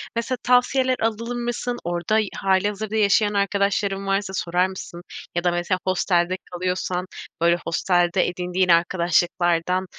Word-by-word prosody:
Mesela 235 +2 -1
tavsiyeler 255 +1 +3
alır 230 +2 -2
mısın? 240 0 -3
Orada 175 +5 0 0.2
hâlihazırda 205 +3 0
yaşayan 205 0 +3
arkadaşların 200 0 0
varsa 195 0 -1
sorar 180 0 +1
mısın? 185 -2 -8 0.3
Ya 175 - 0
da 175 - +2
mesela 175 +1 -1
hostelde 180 -1 +1 0.2
kalıyorsan, 180 0 -2 0.4
böyle, 170 +1 +4
hostelde 175 +1 +2
edindiğin 180 +1 -1
arkadaşlıklardan, 175 +1 +2
190 Hz, 120 wpm, -23 LUFS, 175-210 Hz, 0.4 s, böyle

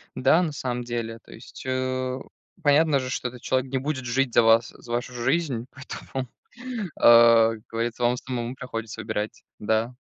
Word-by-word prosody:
Да, 135 +7 +4
на 170 -4 -1
самом 125 -4 -3
деле 115 -1 -4
то - - -18
есть, - - -11
э, 130 0 -1 0.4
понятно 145 -1 +4
же, 130 0 -4
что 125 - -2
этот 125 -1 -13
человек 130 0 -1
не 135 - +1
будет 130 -1 -3
жить 125 +1 0
за 120 - +6
вас, 115 0 +5
за 120 - -11
вашу 120 +1 -2
жизнь, 125 0 -1
поэтому, 135 -1 -6 0.7
а, 115 -1 +7
как 110 -1 -12
говорится 115 +1 -2
вам 120 +1 +3
самому 125 -1 -4
приходится 115 -3 -6
выбирать, 105 -1 -4 0.2
да. 110 +3 0
125 Hz, 175 wpm, -25 LUFS, 115-130 Hz, 0.7 s, а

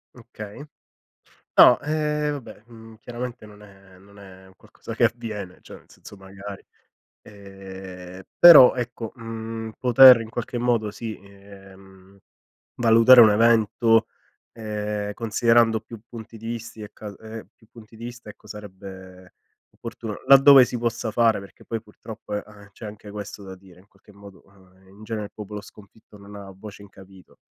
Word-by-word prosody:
Okay. 115 -1 -11 0.9
No, 125 - +7
ehm, 150 0 -2
vabbè, 135 -6 -9
uhm, 115 -1 -15
chiaramente 120 -1 -8
non 105 -1 -16
è 95 -2 -19
non 100 +2 -20
è 95 -1 -15
un 95 - -20
qualcosa - - -12
che - - 0
avviene. 110 -6 -3
Cioè, - - -13
nel - - -24
senso, - - -15
magari. 95 +1 -11 0.6
Ehm, 95 -2 -12 0.2
però, 165 -7 +9
ecco, 120 -2 -6
uhm, 115 -1 -7
poter 125 0 +7
in 115 - -8
qualche 120 +1 -5
modo, 120 -3 0
sì, 110 +1 -8
ehm, 95 -1 -18 0.6
valutare 115 +2 +6
un 110 - +6
evento, 115 +1 +2 0.5
ehm, 105 -2 -5
considerando 115 0 +1
più 110 0 -13
punti 115 -1 -11
di 115 +1 -9
visti 115 -1 -7
e 105 - -10
cal 105 -2 -11
ehm, 110 -2 -11
più 110 - -26
punti 110 -1 -16
di 115 - -11
vista, 120 -2 -10
ecco, 105 0 -14
sarebbe 95 -3 -12 0.4
opportuno 115 -2 -8
laddove 135 -1 +8
si 120 - -5
possa 115 -1 -3
fare, 115 -1 +1
perché 100 - -16
poi, 115 -1 -5
purtroppo, 105 0 -11
e, 105 - -3
ehm, 100 -1 -17
c'è 110 - -13
anche 105 0 -11
questo 105 0 -9
da 95 -1 -10
dire, 90 -1 -20
in 100 - -26
qualche 100 +1 -23
modo, 100 -1 -16
ehm, 95 -1 -25
in 100 +3 -18
genere, 110 -1 -5
il 100 - -18
popolo 105 -1 -8
sconfitto 105 0 -18
non 100 +1 -14
ha 100 -1 -11
voce 100 +1 -12
in 100 - -16
capitolo, 95 -1 -18
105 Hz, 165 wpm, -23 LUFS, 100-115 Hz, 0.9 s, però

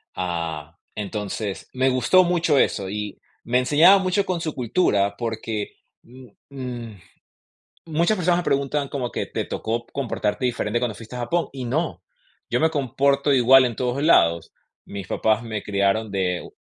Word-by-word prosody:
Ah, 85 -2 -4 0.2
entonces, 105 0 -4
me 130 +1 +2
gustó 130 +9 +4
mucho 170 -4 +2
eso 95 -6 +1
y 105 0 -5 0.2
me 125 +2 +2
enseñaba 155 +9 +6
mucho 190 +1 0
con 180 -3 -2
su 155 -2 -3
cultura, 105 - +1
porque, 110 -2 -4 0.3
mm, 125 +1 -15 0.2
mm, 120 -6 -7 0.9
muchas 170 +6 +1
personas 175 -1 +2
me 175 - -7
preguntan 140 +1 0
como 130 -4 -3
que: - - -3
"¿Te - - -3
tocó 115 +2 -3
comportarte 125 -3 -3
diferente 120 -2 0
cuando 120 -4 -2
fuiste 115 +3 -10
a - - -4
Japón?", 165 +8 -1
y 130 -2 -6
no, 140 +8 -2 0.5
yo - - 0
me 160 - +3
comporto 140 0 +1
igual 130 0 +6
en 120 -2 -1
todos 125 +3 -1
lados, 85 - +3 0.3
mis 100 -2 -7
papás 110 +1 +1
me 110 -3 -5
criaron 100 +2 0
de 90 -2 -2
125 Hz, 160 wpm, -23 LUFS, 105-140 Hz, 0.9 s, enseñaba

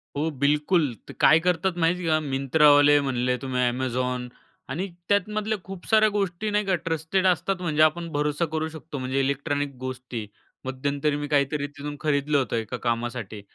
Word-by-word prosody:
हो 155 +3 0
बिलकुल. 150 0 +2 0.2
ते - - -7
काय 155 - +6
करतात 180 +1 +1
माहिती 170 +1 +1
आहे 155 -1 +3
का 155 - -6
Myntraवाले 145 +1 +5
म्हणले 125 -2 0
तुम्ही 130 -2 -1
Amazon 125 0 -2 0.4
आणि 170 +9 -2 0.2
त्यातमधल्या 210 +2 0
खूप 190 -2 -9
साऱ्या 215 -1 +5
गोष्टी 200 0 -1
नाही 210 0 +1
का 190 -2 +2
ट्रस्टेड 165 +4 0
असतात. 185 +1 0
म्हणजे 155 -3 0
आपण 170 +2 +2
भरोसा 150 +2 0
करू 160 0 0
शकतो 160 -1 -8
म्हणजे 130 +1 -1
इलेक्ट्रॉनिक 140 0 -1
गोष्टी. 130 -3 -5 0.4
मध्यंतरी 140 +3 -1
मी 145 0 -3
काहीतरी 145 0 +1
तिथून 145 0 -7
खरीदलं 145 -1 +1
होतं 130 -3 0
एका 115 +2 -3
कामासाठी, 115 -3 -3
145 Hz, 165 wpm, -25 LUFS, 130-170 Hz, 0.4 s, काय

